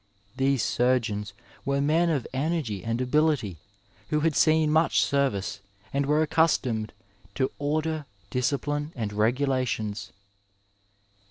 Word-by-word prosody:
These 135 -2 +2
surgeons 115 -5 0 0.3
were 140 0 0
men 160 +4 +3
of 145 -6 0
energy 135 - -1
and 115 +1 -1
ability, 130 - +1 0.5
who 150 0 +1
had 160 -1 +1
seen 155 -1 +4
much 160 +1 +3
service, 105 -9 0 0.3
and 140 0 0
were 150 +2 +3
accustomed 150 -9 +1 0.4
to 130 -1 0
order, 155 +1 -1 0.2
discipline 145 +4 -1
and 110 -5 -3
regulations. 110 -3 0
140 Hz, 110 wpm, -27 LUFS, 115-150 Hz, 0.5 s, seen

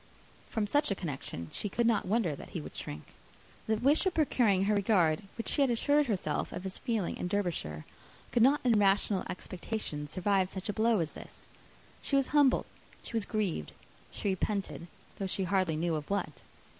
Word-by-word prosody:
From 220 -2 0
such 290 +8 +2
a 200 - 0
connection 135 - -5
she 205 - -3
could 235 +4 0
not 230 -5 +2
wonder 200 -7 +1
that - - -10
he 170 - -4
should 150 - -9
shrink. 75 +1 -6 0.6
The 220 - +2
wish 285 - +4
of 370 - 0
procuring 230 - +3
her 210 +2 +2
regard, 185 -6 +3 0.2
which 230 - -4
she 290 - +1
had 275 - +4
assured 285 +5 +3
herself 180 -9 -1
of - - -6
his 190 -1 -4
feeling 225 -8 -1
in - - -3
Derbyshire, 170 - -2 0.5
could 240 - +2
not 275 +5 +5
in 235 -4 +4
rational 195 -1 +3
expectation 180 -5 -4
survive 185 +3 +1
such 190 +1 -5
a - - 0
blow 220 -2 +3
as 160 - -2
this. - - -11 0.5
She 280 - -1
was 275 -1 +2
humbled, 285 -3 +4 0.4
she - - -7
was 225 -3 +1
grieved; 200 - -2 0.4
she 205 - -3
repented, 190 -2 -2 0.3
though 195 - -1
she 190 +1 -1
hardly 185 -3 +1
knew 165 +2 0
of 150 -2 -3
what. 190 -7 -2
200 Hz, 190 wpm, -31 LUFS, 175-230 Hz, 0.6 s, not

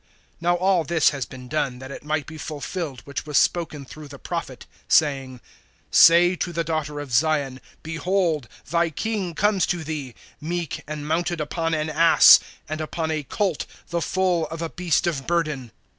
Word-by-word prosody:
(4)Now 175 +1 +2
all 185 -2 +3
this 160 0 +3
has 135 -7 -4
been 125 +1 -11
done, 135 -3 -1
that 130 +1 -9
it - - -8
might 150 -1 -1
be 155 0 -10
fulfilled 150 0 -5
which 140 +1 -6
was 150 - +1
spoken 160 -5 +1
through 150 +3 -11
the 140 0 -11
prophet, 165 -5 -5 0.2
saying: 135 -4 +2 0.5
(5)Say 175 +2 +6
to 175 - -2
the 165 0 -1
daughter 155 -2 -3
of 145 -3 -7
Zion, 140 0 +1 0.2
Behold, 165 -3 0 0.2
thy 170 0 +2
King 190 0 -3
comes 205 0 +2
to 175 -2 -2
thee, 145 -5 -5 0.3
Meek, 170 0 -3
and 150 -1 -5
mounted 170 +2 -1
upon 165 +2 -1
an 155 0 -1
ass, 165 +2 +8 0.3
And 155 +1 -4
upon 160 +1 -3
a 155 -1 -1
colt, 175 +4 -2 0.2
the 170 -1 -1
foal 180 -3 0
of 165 +2 -6
a 165 - -3
beast 180 -2 0
of 145 -6 -2
burden. 150 -8 -1
160 Hz, 175 wpm, -23 LUFS, 145-170 Hz, 0.5 s, ass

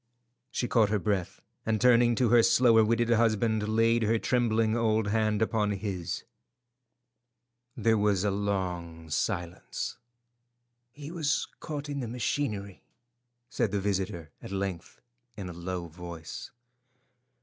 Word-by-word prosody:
She 120 - -2
caught 110 -4 +3
her 105 - +2
breath, 100 -3 -2 0.2
and 110 -1 0
turning 120 0 +5
to 120 0 +2
her 120 0 +7
slower 115 -1 +5
witted 115 +2 +1
husband, 110 -1 +2
laid 115 +1 +3
her 110 +1 +2
trembling 115 -2 +1
old 110 -2 +1
hand 110 0 +2
upon 105 -2 +1
his. 95 -4 -4 1.5
There 110 -2 +3
was 100 -2 +2
a 105 - +2
long 90 -5 -3
silence. 85 +3 -3 0.9
"He 145 +4 -9
was 155 -4 0
caught 145 -2 -5
in 145 -1 -3
the 125 - -3
machinery," 110 -5 -2 0.7
said 120 -3 0
the 100 +1 -1
visitor 95 -5 -2
at - - -8
length 95 -3 -4 0.4
in 95 -3 -5
a - - -7
low 85 +1 -4
voice. 85 -1 -8
110 Hz, 130 wpm, -29 LUFS, 95-115 Hz, 1.5 s, her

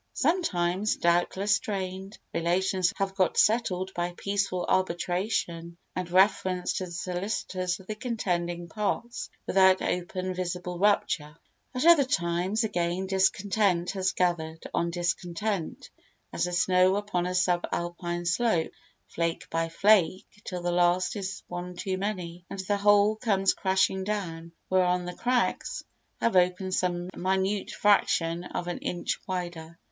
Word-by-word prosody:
Sometimes, 205 - +1
doubtless, 175 +4 +2
strained 190 0 -5 0.2
relations 185 +2 +1
have 195 -1 -1
got 190 -2 +1
settled 190 -5 +2
by 175 0 -3
peaceful 200 -3 -1
arbitration 175 -1 -1 0.2
and 185 -1 -3
reference 185 -1 +2
to 185 - -2
the 175 - -10
solicitors 185 0 -3
of 190 - -14
the 215 - -4
contending 175 -7 -2
parts 210 +6 -3 0.2
without 190 -1 +5
open 185 +1 -2
visible 180 -1 -4
rupture; 165 -6 +1 0.4
at 255 - 0
other 335 -4 +8
times, 180 -1 0
again, 175 -2 -1
discontent 190 -1 +1
has 190 -1 0
gathered 165 -3 -1
on 170 0 +1
discontent 175 +2 -3 0.4
as - - 0
the 180 - -3
snow 185 +1 +4
upon 205 -4 -1
a 180 - -2
sub 180 -1 +2
alpine 175 0 -3
slope, 175 -2 +1 0.3
flake 165 0 -3
by 165 0 0
flake, 190 +1 +3 0.2
till 180 -2 -5
the 175 - 0
last 175 +2 +2
is 195 -2 -5
one 180 0 -6
too 190 +1 -2
many 180 -4 -4
and - - -6
the 205 +2 0
whole 205 +1 +4
comes 195 -4 +2
crashing 190 0 +1
down—whereon 180 -1 -1
the 180 - -5
cracks 250 - -1 0.4
have 230 - +1
opened 180 +1 +2
some 175 -1 0
minute 190 +2 0
fraction 180 -5 +2
of 175 - -4
an 175 - -3
inch 175 -1 -2
wider. 175 -3 -5
185 Hz, 135 wpm, -28 LUFS, 175-200 Hz, 0.4 s, other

